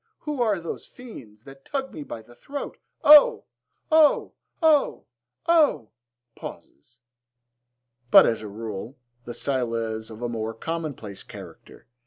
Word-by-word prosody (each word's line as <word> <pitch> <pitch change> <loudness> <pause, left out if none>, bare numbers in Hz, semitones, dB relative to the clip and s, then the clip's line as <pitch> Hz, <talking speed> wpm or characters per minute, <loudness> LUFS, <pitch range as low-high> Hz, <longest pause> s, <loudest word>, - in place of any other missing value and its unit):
Who 295 -4 -3
are 215 -5 +1
those 170 - -7
fiends 115 - -13
That 135 0 -14
tug 270 -1 -4
me 155 - -7
by 115 -5 -8
the 120 - -18
throat? 280 - -7 0.2
O! 295 0 +8 0.5
O! 310 -2 +4 0.3
O! 310 -3 +3 0.4
O! 300 - +3 0.4
(Pauses.) 115 - -12 1.1
But, - - +9
as 115 - 0
a 110 - -7
rule, 110 +4 -7 0.3
the 120 - -7
style 125 -4 -2
is 110 -1 -3
of 110 +1 -9
a - - 0
more 115 -1 -4
commonplace 145 -9 -5
character. - - -13
125 Hz, 135 wpm, -25 LUFS, -, 1.1 s, But